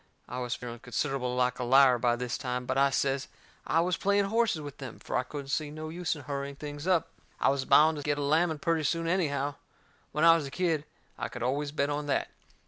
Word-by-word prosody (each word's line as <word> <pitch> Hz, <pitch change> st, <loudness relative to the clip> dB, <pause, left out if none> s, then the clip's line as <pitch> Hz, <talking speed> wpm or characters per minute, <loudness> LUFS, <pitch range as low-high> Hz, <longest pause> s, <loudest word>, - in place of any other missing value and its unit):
I 125 Hz, -, -5 dB
was 125 Hz, -1 st, -2 dB
feeling 120 Hz, -1 st, -7 dB
considerable 125 Hz, 0 st, -2 dB
like 125 Hz, 0 st, +1 dB
a -, -, -1 dB
liar 130 Hz, 0 st, +6 dB
by 120 Hz, 0 st, +2 dB
this 125 Hz, 0 st, -3 dB
time, 125 Hz, -2 st, -3 dB
but -, -, -1 dB
I 140 Hz, +1 st, +4 dB
says 135 Hz, 0 st, 0 dB, 0.4 s
I 165 Hz, -, +3 dB
was 175 Hz, 0 st, 0 dB
playing 200 Hz, +1 st, +2 dB
horses 225 Hz, -4 st, +1 dB
with 145 Hz, -2 st, -9 dB
them, 130 Hz, -5 st, -7 dB
fur -, -, -6 dB
I -, -, +3 dB
couldn't 135 Hz, +2 st, -7 dB
see 150 Hz, +1 st, -1 dB
no 155 Hz, +1 st, -6 dB
use 175 Hz, +1 st, -2 dB
in 145 Hz, -, -10 dB
hurrying 140 Hz, +1 st, -4 dB
things 145 Hz, +2 st, -7 dB
up. 180 Hz, -4 st, +2 dB, 0.3 s
I -, -, +3 dB
was 135 Hz, -1 st, 0 dB
bound 155 Hz, +1 st, +5 dB
to 145 Hz, -, -5 dB
get 145 Hz, 0 st, 0 dB
a 145 Hz, -, -2 dB
lamming 160 Hz, +3 st, +2 dB
purty 165 Hz, +2 st, 0 dB
soon 165 Hz, +3 st, 0 dB
anyhow. 145 Hz, -5 st, 0 dB, 0.5 s
When 150 Hz, -, -1 dB
I 165 Hz, 0 st, +8 dB
was 155 Hz, -4 st, -2 dB
a -, -, -7 dB
kid 160 Hz, -2 st, 0 dB, 0.3 s
I -, -, -3 dB
could 125 Hz, -, -6 dB
always 140 Hz, +3 st, -1 dB
bet 145 Hz, -1 st, 0 dB
on 145 Hz, 0 st, -3 dB
that. 140 Hz, -, 0 dB
145 Hz, 235 wpm, -29 LUFS, 130-160 Hz, 0.5 s, I